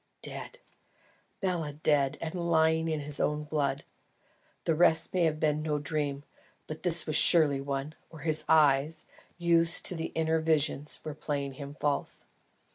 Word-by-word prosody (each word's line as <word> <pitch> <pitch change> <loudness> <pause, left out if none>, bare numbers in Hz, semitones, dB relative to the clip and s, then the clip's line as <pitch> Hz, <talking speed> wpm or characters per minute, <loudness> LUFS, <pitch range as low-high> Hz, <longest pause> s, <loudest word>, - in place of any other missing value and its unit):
Dead! - - -8 0.8
BELA! 170 -6 -2
Dead! 145 -2 +1
and 165 -1 -5
lying 160 -2 +1
in 155 -2 -2
his 145 0 -5 0.3
blood! 140 -2 -1 0.8
The 165 - +1
rest 160 0 +3
may 180 -2 +2
have 155 -1 0
been 150 -1 +1
no 155 -1 -1
dream, 145 -1 -3 0.4
but 155 0 -8
this 170 -2 +3
was 155 - 0
surely 145 -5 +6
one, 140 +2 -4 0.2
or 160 -3 -12
his 155 0 0
eyes, 150 0 +3 0.3
used 170 -1 +1
to - - 0
inner 160 0 0
visions, 150 -2 0
were 155 - -5
playing 140 -2 -4
him 140 +1 -9
false. 145 -1 -2
155 Hz, 145 wpm, -29 LUFS, 145-160 Hz, 0.8 s, surely